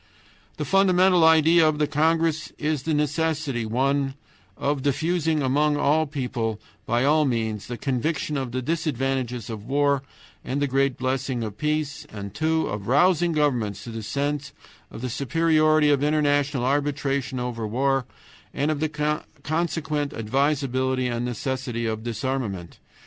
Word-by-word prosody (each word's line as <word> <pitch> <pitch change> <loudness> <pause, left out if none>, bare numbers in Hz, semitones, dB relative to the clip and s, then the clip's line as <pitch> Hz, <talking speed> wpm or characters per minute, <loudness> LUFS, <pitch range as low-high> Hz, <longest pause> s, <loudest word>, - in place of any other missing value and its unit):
The - - -3
fundamental 185 -2 +4
idea 160 0 +6
of 150 - -1
the 150 - +2
congress 160 +1 +1
is 150 -2 -1
the 160 +3 -1
necessity 150 -5 -1
(1) 135 +3 0 0.4
of 140 -1 -1
diffusing 160 +2 0
among 145 +3 +2
all 155 +2 +2
people 125 -6 -3 0.3
by 120 +2 +2
all 155 +2 +4
means 110 -6 -1
the 120 - -5
conviction 145 +4 -1
of 130 -3 -2
the 130 +1 -3
disadvantages 135 -6 -1
of 110 -3 -6
war 140 0 +2 0.4
and 135 +3 -2
the 145 - +2
great 135 -1 +1
blessing 130 -1 -1
of 105 -2 -6
peace, 150 -1 -2
and 100 -2 -7
(2) 160 +3 +1
of 100 -1 -5
rousing 175 +6 +3
governments 125 -10 0
to 120 - -7
the 115 0 -5
sense 140 +4 -2 0.4
of - - -9
the 130 - -2
superiority 155 +2 +3
of 140 -2 +2
international 145 -3 +1
arbitration 140 -2 0
over 120 -3 -3
war 135 +3 0 0.5
and 145 +2 +1
of 150 - -2
the 150 0 -1 0.2
consequent 155 -2 -1
advisability 130 +1 0
and 120 0 -2
necessity 125 0 -3
of 110 -1 -2
disarmament. 115 -6 -3
140 Hz, 145 wpm, -24 LUFS, 125-155 Hz, 0.5 s, idea